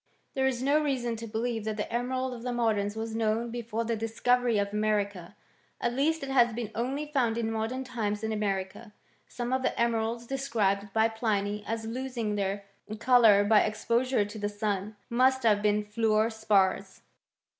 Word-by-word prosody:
There 265 -1 +1
is 255 -1 -1
no 290 +3 +3
reason 250 -5 -1
to 230 +1 -7
believe 225 0 -2
that 215 -1 -2
theT 210 - -4
emerald 255 +2 -1
of 240 - -8
the 250 - -4
modems 220 -4 0
was 225 0 -4
known 225 +1 0
before 230 -1 -3
the 230 0 0
discoC 225 +3 +1
very 240 -3 +1
of 200 0 -1
America. 205 -3 -1 0.4
At 240 - -1
least 300 +4 +1
it 275 - -4
has 240 -3 +4
been 230 -3 -4
only 265 +6 -2
found 255 -6 0
in 225 -1 -1
modern 225 +4 -2
times 215 -4 -3
in 220 - -1
America. 205 +1 -3 0.3
Some 245 +1 -4
of 260 - +1
the - - -1
emeralds 235 0 0
dttf 270 +3 -3
scribed 205 -7 0
by 220 +2 +3
Pliny 210 -2 -1
as 225 0 -3
losing 235 -2 -3
their 200 0 -2 0.3
colour 230 -4 +6
by 210 +1 +5
exposure 230 +2 +1
tPi 205 +1 -8
the 205 - 0
sun, 205 0 -3
must 260 +2 +2
have 210 -3 +4
been 210 0 +1
fiuor 220 +1 +1
spars. 200 -3 +1
225 Hz, 185 wpm, -29 LUFS, 210-245 Hz, 0.4 s, colour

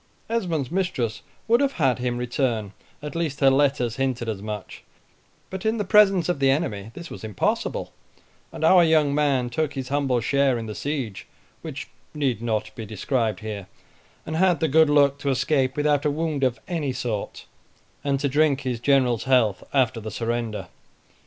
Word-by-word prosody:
Esmond's 170 - -1
mistress 175 - -1 0.3
would 235 +3 +4
have 280 -1 +1
had 135 -6 +1
him 125 -1 -1
return, 120 -4 -1 0.3
at 150 - -5
least 160 -5 -2
her 135 -1 +5
letters 135 -4 +1
hinted 130 -3 -1
as 105 -3 -3
much; 105 -1 -7 0.7
but 190 0 -5
in 220 +1 +1
the 210 - 0
presence 195 -3 +5
of 175 -5 -1
the 135 -1 +3
enemy 110 -9 -1
this 170 -1 -9
was - - -9
impossible, 105 -3 -2 0.6
and - - -7
our 175 +2 +7
young 155 -3 +3
man 140 -4 +2
took 145 +5 -2
his 130 -2 -5
humble 135 -3 +1
share 135 +1 +2
in 115 - -5
the 110 - -5
siege, 135 -6 -4 0.3
which - - -6 0.3
need 130 -7 0
not 110 -2 -2
be 115 - -7
described 110 +2 -1
here, 105 -3 -6 0.6
and 160 - -3
had 180 -3 +3
the 160 - +1
good 160 +1 +5
luck 140 -1 +4
to 140 - -2
escape 135 0 +1
without 145 -1 +2
a 150 - +2
wound 150 -1 -2
of 125 -3 +1
any 160 -6 -2
sort, 120 -5 -4 0.6
and 140 -1 0
to 140 - 0
drink 145 0 +2
his 125 -4 -3
general's 125 -3 +2
health 125 -7 +2
after 125 -4 +1
the 110 - -5
surrender. 115 0 -3
135 Hz, 180 wpm, -24 LUFS, 120-150 Hz, 0.7 s, our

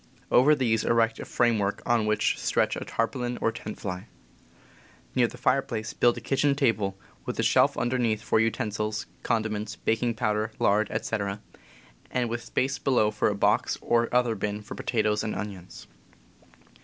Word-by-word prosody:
Over 145 +5 +6
these 115 -5 +1
erect 115 -1 +2
a - - -6
framework, 110 -4 +1
on 115 -2 +2
which 105 0 +2
stretch - - +1
a - - -4
tarpaulin 120 +1 -2
or 115 - +1
tent 110 -1 -8
fly. 95 +2 -5 1.1
Near 125 -2 +3
the 125 - -11
fire 130 +2 +2
place 110 -4 -5
build 120 -1 +3
a - - -6
kitchen 140 +1 +1
table, 105 -8 +1 0.3
with - - -4
a - - +1
shelf - - +4
underneath 120 -4 0
for - - +2
utensils, 110 -2 -1 0.2
condiments, 110 -2 -1
baking 115 +1 0
powder, 110 0 -1
lard, 105 +1 +2
etc., 100 -3 -2
and - - -9 0.2
THE - - -20
CAMP - - -26
79 125 -2 0
with 120 0 -3
space 135 +3 -1
below 120 -6 +2
for 105 - +1
a 105 - -1
box 105 +5 +2
or 120 0 +1
other 125 -2 +2
bin 105 0 -3
for 105 - -8
potatoes 105 -2 0
and 110 - -3
onions. 100 -4 -7
110 Hz, 175 wpm, -27 LUFS, 105-120 Hz, 1.1 s, Over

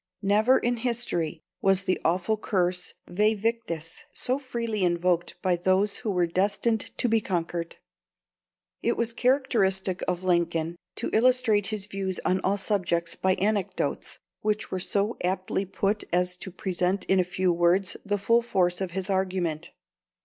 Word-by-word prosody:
Never 215 +6 +4
in 240 0 0
history 225 -10 -1 0.2
was 195 0 +4
the 185 -1 0
awful 180 +6 +1
curse 180 -4 -1
Væ 210 +4 +2
victis 205 -8 -2
so 255 +2 -1
freely 230 -6 -2
invoked 175 0 +1
by 185 -2 +3
those 190 +3 +1
who 230 - -4
were 180 -3 +2
destined 200 +5 +1 0.2
to - - +1
be 225 -1 +3
conquered. 170 -3 -3 1.1
It - - 0
was 235 0 0
characteristic 220 -8 +1
of 180 0 -1
Lincoln 170 -2 +1 0.2
to - - -2
illustrate 230 -3 +3
his 210 -2 -3
views 195 -2 -3
on 185 - +2
all 200 +2 +1
subjects 175 -4 -1
by 185 0 +2
anecdotes, 205 0 -1 0.2
which 215 0 -1
were 185 - -1
so 200 +4 0
aptly 185 +1 -1
put 200 +2 -1
as 180 +1 +1
to 190 - -7
present 185 +1 -1
in 190 - +3
a - - +4
few 180 0 0
words 175 +3 +2
the 205 0 0
full 230 +4 +3
force 180 -6 +1
of 185 -3 -3
his 190 0 -3
argument. 185 -5 -1
190 Hz, 155 wpm, -27 LUFS, 180-215 Hz, 1.1 s, Never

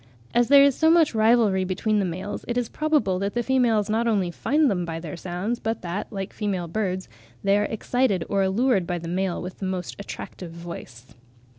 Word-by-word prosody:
As 240 0 +3
there 280 0 +8
is 280 -1 +5
so 320 +5 +3
much 325 -4 +5
rivalry 220 -3 +3
between 205 +3 0
the 200 - +1
males, 185 +4 -5
it 240 - -2
is 245 -2 -1
probable 295 -12 +1
that 200 +2 -2
the 240 - +1
females 235 -5 +2
not 225 +2 +1
only 195 -6 +1
find 295 - +2
them 185 -7 0
by 165 -1 -4
their 165 -1 -6
sounds, 185 +7 -3
but 225 -2 -3
that, 175 +6 -4
like 195 -1 -5
female 190 -5 -2
birds, 185 0 -2 0.4
they 195 0 +3
are 205 0 +2
excited 220 -4 0
or 200 -1 +1
allured 195 0 +2
by 175 - -1
the 170 0 -7
male 185 +1 -1
with 180 +1 -7
the 195 - -3
most 185 -1 -4
attractive 185 -3 -8
voice. 165 -8 -10
200 Hz, 205 wpm, -24 LUFS, 180-235 Hz, 0.4 s, there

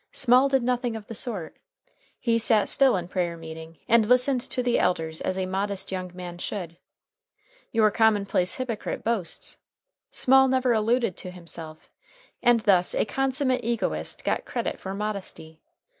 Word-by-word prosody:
Small 255 +1 +4
did 270 -2 +2
nothing 245 -1 0
of 220 -2 -7
the 225 - -8
sort. 205 -7 -5 0.6
He 230 -2 +1
sat 220 -2 +2
still 270 -4 +4
in 175 -1 -4
prayer 175 -2 -2
meeting, 160 0 -10
and 230 -1 +4
listened 250 +1 +3
to 250 0 -1
the 245 -1 +2
elders 160 -3 0
as 185 - -2
a 190 - -1
modest 195 +1 -2
young 185 -1 -4
man 175 -1 -8
should. 175 -4 -5 0.9
Your 215 -2 +3
commonplace 200 -5 +2
hypocrite 240 -5 -4
boasts. 220 -7 -3 0.5
Small 265 +1 +4
never 260 -1 +2
alluded 225 -2 +1
to 185 - -5
himself, 165 -3 -8 0.5
and 240 -2 +4
thus 185 -4 +3
a - - +2
consummate 260 +1 0
egotist 235 0 -2
got - - 0
credit - - -3
for 190 0 -5
modesty. 195 -6 -5
215 Hz, 155 wpm, -26 LUFS, 180-245 Hz, 0.9 s, Small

